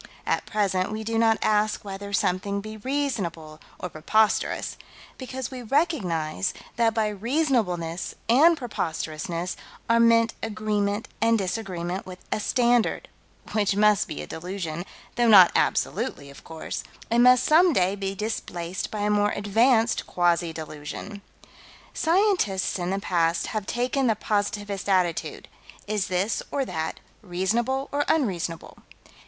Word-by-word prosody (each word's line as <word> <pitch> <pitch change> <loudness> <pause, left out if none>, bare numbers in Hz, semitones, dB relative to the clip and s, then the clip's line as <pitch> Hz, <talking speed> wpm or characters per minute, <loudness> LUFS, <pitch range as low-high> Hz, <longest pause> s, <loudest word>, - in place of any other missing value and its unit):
At - - -1
present 195 -2 0
we 215 0 -4
do 225 +1 -1
not 225 -1 +4
ask 215 0 +1
whether 200 +1 -6
something 200 +1 0
be 215 +2 -8
reasonable 205 - -3 0.2
or - - -5
preposterous, 205 +7 +1 0.4
because 260 0 -5
we 255 -1 -6
recognize 200 - 0 0.2
that 225 -1 +2
by 220 -1 +2
reasonableness 210 - -1
and 315 +8 +6
preposterousness 170 - -3 0.3
are 230 0 +4
meant 230 0 +4
agreement 210 -1 -1
and 230 0 +4
disagreement 185 -3 -3
with 185 -1 -8
a - - 0
standard 240 +1 +1 0.4
which 205 -2 +1
must 210 -1 +4
be 75 - -5
a - - -6
delusion 175 - -5 0.3
though 240 -1 +3
not 190 -5 +9
absolutely, 190 - 0
of 140 - -14
course 160 -1 -6 0.3
and 235 +1 +4
must 250 0 +6
some 340 +4 +5
day 190 - +2
be 195 -1 -3
displaced 185 -4 -4
by 215 - -4
a 205 - +1
more 205 0 +3
advanced 225 +3 +2
quasi 175 -1 +1
delusion. 160 +6 -7 0.7
Scientists 330 - +1
in 175 0 -2
the 195 - 0
past 170 -3 +1
have 215 -3 -3
taken 255 +2 0
the 225 - +3
positivist 205 -1 -2
attitude 180 -3 0 0.4
is 205 -2 -1
this 185 +4 0
or 275 -1 -1
that 160 -7 -4 0.2
reasonable 225 +9 -1
or 290 +1 +1
unreasonable? 180 - -1
205 Hz, 135 wpm, -25 LUFS, 180-230 Hz, 0.7 s, not